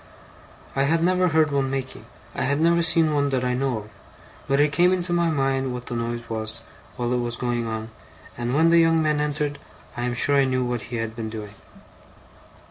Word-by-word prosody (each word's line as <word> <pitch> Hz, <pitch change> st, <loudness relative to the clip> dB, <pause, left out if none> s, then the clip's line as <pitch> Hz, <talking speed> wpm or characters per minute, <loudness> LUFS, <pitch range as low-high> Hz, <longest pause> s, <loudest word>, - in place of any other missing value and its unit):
I 135 Hz, 0 st, +2 dB
had 165 Hz, +3 st, +2 dB
never 185 Hz, +1 st, +3 dB
heard 155 Hz, -2 st, +2 dB
one 135 Hz, -1 st, 0 dB
making; 130 Hz, -1 st, -5 dB, 0.3 s
I -, -, -4 dB
had 140 Hz, +2 st, +1 dB
never 170 Hz, +1 st, +3 dB
seen 165 Hz, -1 st, +3 dB
one 145 Hz, -1 st, +1 dB
that 130 Hz, -2 st, -1 dB
I 125 Hz, -, 0 dB
know 130 Hz, -1 st, 0 dB
of. 105 Hz, 0 st, -9 dB, 0.6 s
but 140 Hz, +1 st, +2 dB
it 145 Hz, 0 st, +3 dB
came 175 Hz, +4 st, +4 dB
into 175 Hz, -1 st, -1 dB
my 170 Hz, -1 st, +2 dB
mind 135 Hz, -3 st, 0 dB
what 125 Hz, 0 st, -7 dB
the 120 Hz, -, -5 dB
noise 120 Hz, 0 st, -3 dB
was, 110 Hz, 0 st, -3 dB, 0.3 s
while 120 Hz, 0 st, -1 dB
it 125 Hz, -, +1 dB
was 120 Hz, -1 st, -2 dB
going 120 Hz, -1 st, -2 dB
on; 110 Hz, 0 st, -5 dB, 0.4 s
and 120 Hz, +2 st, -2 dB
when 165 Hz, +2 st, +4 dB
the 170 Hz, -, +6 dB
young 165 Hz, 0 st, +4 dB
man 150 Hz, -1 st, +1 dB
entered, 145 Hz, -1 st, -2 dB, 0.4 s
I 120 Hz, -, -4 dB
am 125 Hz, 0 st, -2 dB
sure 140 Hz, +3 st, +4 dB
I 140 Hz, -, +4 dB
knew 130 Hz, -1 st, 0 dB
what 120 Hz, -2 st, -2 dB
he 120 Hz, -, -4 dB
had 115 Hz, -1 st, -3 dB
been 115 Hz, -2 st, -4 dB
doing. 105 Hz, -2 st, -7 dB
135 Hz, 215 wpm, -24 LUFS, 120-155 Hz, 0.6 s, the